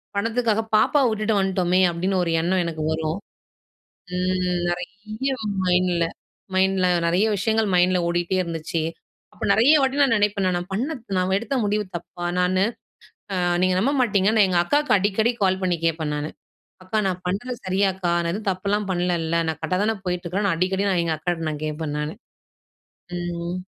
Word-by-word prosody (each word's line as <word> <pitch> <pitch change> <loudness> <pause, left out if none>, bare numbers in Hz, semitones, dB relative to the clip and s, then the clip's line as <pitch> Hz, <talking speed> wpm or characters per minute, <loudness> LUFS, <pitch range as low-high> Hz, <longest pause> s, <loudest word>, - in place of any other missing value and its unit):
பணத்துக்காக 225 +1 +1
பாப்பாவ 265 +6 +4
விட்டுட்டு 215 0 0
வன்டோமே, 185 -1 +2
அப்படின்னு 185 +3 -1
ஒரு 165 - -1
எண்ணம் 180 +2 +1
எனக்கு 160 -2 -3
வரும். 160 +2 -1 1.0
ம். 180 -1 0
நெறைய 215 +8 -4 0.3
மைண்ட்ல 180 -1 +2 0.5
மைண்ட்ல 190 -1 +3 0.2
நெறைய 180 +6 +2
விஷயங்கள் 220 +2 +1
மைண்ட்ல 180 +1 +4
ஓடிட்டே 175 +2 0
இருந்துச்சு. 165 -1 -3 0.5
அப்போ - - -7
நெறைய 235 +8 +5
வாட்டி 265 +1 +1
நான் 265 -5 +4
நினைப்பேன் 205 -1 +1
நானு, 180 -1 +1
நான் 175 +1 -7
பண்ண 270 +10 -1 0.2
நான் 185 +1 +1
எடுத்த 235 +6 -4
முடிவு 210 +1 0
தப்பா? 175 +1 -6
நானு 185 +1 +2 0.7
அ - - -1 0.2
நீங்க 185 0 +3
நம்ப 260 +8 +2
மாட்டீங்க! 205 -4 +2
நான் 210 -3 +6
எங்க 175 -2 +2
அக்காக்கு 290 +11 +2
அடிக்கடி 205 +4 +1
கால் 190 0 +2
பண்ணி 180 -2 +1
கேப்பேன் 160 -2 0
நானு. 150 +1 -3 0.5
அக்கா! 215 +4 -2
நான் 185 -1 -2
பண்றது 215 +7 -2
சரியாக்கா? 190 -1 +1
நான் 170 - 0
எதுவும் 205 +1 -4
தப்புலாம் 200 +2 -1
பண்ணலல? 170 -2 0
நான் 160 - -2
கரெக்டா 165 +3 -1
தான 225 - +1
போயிட்டுருக்கேன்? 180 +3 -1
நான் 165 - +1
அடிக்கடி, 190 +3 +1
நான் 180 - +2
எங்க 165 - 0
அக்காட்ட 165 -1 -2
நான் 150 0 -6
கேப்பேன் 155 -1 -3
நானு. 150 +1 -3 1.0
ம். 175 0 -4
185 Hz, 160 wpm, -23 LUFS, 175-205 Hz, 1.0 s, நான்